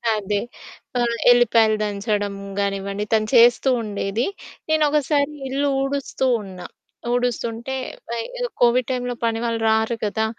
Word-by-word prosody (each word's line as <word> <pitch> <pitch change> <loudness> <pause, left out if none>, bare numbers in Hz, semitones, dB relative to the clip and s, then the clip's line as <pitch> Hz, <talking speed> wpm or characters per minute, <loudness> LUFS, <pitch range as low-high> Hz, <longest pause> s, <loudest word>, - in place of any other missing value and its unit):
అదే. 205 -1 -1 0.6
ఆహ్, 235 -1 0
ఎల్లిపాయలు 230 -2 +4
దంచడం 205 -1 -2 0.2
గానివ్వండి, 200 +1 -2
తను 215 -1 +2
చేస్తూ 240 +3 +6
ఉండేది. 210 +2 -2 0.4
నేను 315 -1 +3
ఒకసారి 290 0 +1 0.2
ఇల్లు 280 +2 0
ఊడుస్తూ 275 -1 -2 0.2
ఉన్నా. 185 -2 -9 0.5
ఊడుస్తుంటే 245 0 -2 0.3
వయ్ 235 -1 -2
ఏదో - - -1
కోవిడ్ 245 0 +4
టైమ్‌లో 245 -1 -2
పని 225 -1 0
వాళ్ళు 230 -1 -1
రారు 220 +1 +2
కదా. 220 +2 0
230 Hz, 125 wpm, -22 LUFS, 210-250 Hz, 0.6 s, చేస్తూ